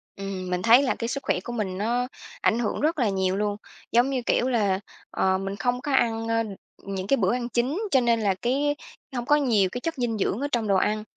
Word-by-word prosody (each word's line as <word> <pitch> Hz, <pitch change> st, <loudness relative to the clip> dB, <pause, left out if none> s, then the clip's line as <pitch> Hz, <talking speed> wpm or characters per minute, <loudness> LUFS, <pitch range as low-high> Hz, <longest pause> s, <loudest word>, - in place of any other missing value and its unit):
Ừm, 195 Hz, -2 st, -5 dB
mình 180 Hz, 0 st, -1 dB
thấy 235 Hz, +6 st, +6 dB
là 260 Hz, -, +1 dB
cái 230 Hz, -, -3 dB
sức 275 Hz, +3 st, -3 dB
khỏe -, -, +1 dB
của 240 Hz, +6 st, -7 dB
mình 195 Hz, -5 st, -2 dB
nó 240 Hz, +5 st, 0 dB, 0.3 s
ảnh 225 Hz, -, +2 dB
hưởng 235 Hz, +2 st, -1 dB
rất 315 Hz, +1 st, +1 dB
là 235 Hz, -5 st, +2 dB
nhiều 190 Hz, -1 st, 0 dB
luôn, 205 Hz, 0 st, -1 dB, 0.3 s
giống 240 Hz, +3 st, +4 dB
như 265 Hz, -2 st, -1 dB
kiểu 250 Hz, -, +2 dB
là, 205 Hz, -6 st, +1 dB, 0.3 s
ờ, 190 Hz, 0 st, +2 dB
mình 195 Hz, +1 st, -4 dB
không 245 Hz, +5 st, -1 dB
có 295 Hz, -, -3 dB
ăn, 225 Hz, -3 st, +1 dB
ơ 230 Hz, 0 st, +1 dB, 0.4 s
những 195 Hz, -1 st, -4 dB
cái 275 Hz, -, +3 dB
bữa 190 Hz, -1 st, +2 dB
ăn 245 Hz, -1 st, -2 dB
chính, 250 Hz, -, 0 dB
cho 265 Hz, -, +5 dB
nên 235 Hz, -1 st, +2 dB
là 200 Hz, -2 st, +2 dB
cái 285 Hz, +4 st, +1 dB, 0.4 s
hông 240 Hz, -1 st, -2 dB
có 295 Hz, -, +5 dB
nhiều 230 Hz, -10 st, +3 dB
cái 245 Hz, -, -5 dB
chất 330 Hz, +3 st, -2 dB
dinh 240 Hz, -3 st, -1 dB
dưỡng 200 Hz, +1 st, 0 dB
ở 285 Hz, -, 0 dB
trong 230 Hz, -4 st, 0 dB
đồ 200 Hz, -, +3 dB
ăn, 210 Hz, +3 st, +1 dB
230 Hz, 245 wpm, -25 LUFS, 195-250 Hz, 0.4 s, thấy